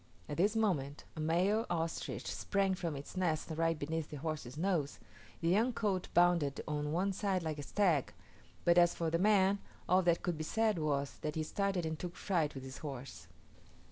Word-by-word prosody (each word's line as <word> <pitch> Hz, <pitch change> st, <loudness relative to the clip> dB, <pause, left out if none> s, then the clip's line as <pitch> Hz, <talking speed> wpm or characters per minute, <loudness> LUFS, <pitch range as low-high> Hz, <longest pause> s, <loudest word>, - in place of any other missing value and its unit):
At 145 Hz, -, -5 dB
this 205 Hz, +5 st, +3 dB
moment, 150 Hz, -11 st, 0 dB
a -, -, -7 dB
male 185 Hz, +8 st, +2 dB
ostrich 165 Hz, -1 st, -2 dB
sprang 195 Hz, -1 st, 0 dB
from 170 Hz, -4 st, -3 dB
its 140 Hz, +5 st, -8 dB
nest 165 Hz, -4 st, 0 dB
right 165 Hz, 0 st, +1 dB
beneath 155 Hz, +1 st, -3 dB
the 150 Hz, -, -6 dB
horse's 150 Hz, -3 st, -4 dB
nose: 165 Hz, -5 st, 0 dB, 0.4 s
the 165 Hz, -, 0 dB
young 225 Hz, +7 st, +3 dB
colt 195 Hz, -5 st, -1 dB
bounded 170 Hz, -5 st, +4 dB
on 150 Hz, 0 st, -2 dB
one 190 Hz, +4 st, +1 dB
side 190 Hz, -2 st, 0 dB
like 155 Hz, -2 st, -3 dB
a -, -, -2 dB
stag; 165 Hz, -3 st, +1 dB, 0.5 s
but 175 Hz, 0 st, +6 dB
as 175 Hz, 0 st, +4 dB
for 165 Hz, -1 st, -1 dB
the 165 Hz, -, +1 dB
man, 200 Hz, 0 st, +4 dB, 0.3 s
all 185 Hz, +1 st, +5 dB
that 170 Hz, -2 st, +2 dB
could 170 Hz, -3 st, -1 dB
be -, -, -1 dB
said 215 Hz, +3 st, +1 dB
was, 140 Hz, -2 st, -1 dB
that 150 Hz, 0 st, -3 dB
he 160 Hz, -, 0 dB
started 195 Hz, +1 st, -1 dB
and 160 Hz, -1 st, -3 dB
took 175 Hz, -1 st, -5 dB
fright 165 Hz, -7 st, 0 dB
with 135 Hz, -, -6 dB
his 130 Hz, 0 st, -8 dB
horse. 125 Hz, -, -7 dB
165 Hz, 195 wpm, -34 LUFS, 150-190 Hz, 0.5 s, but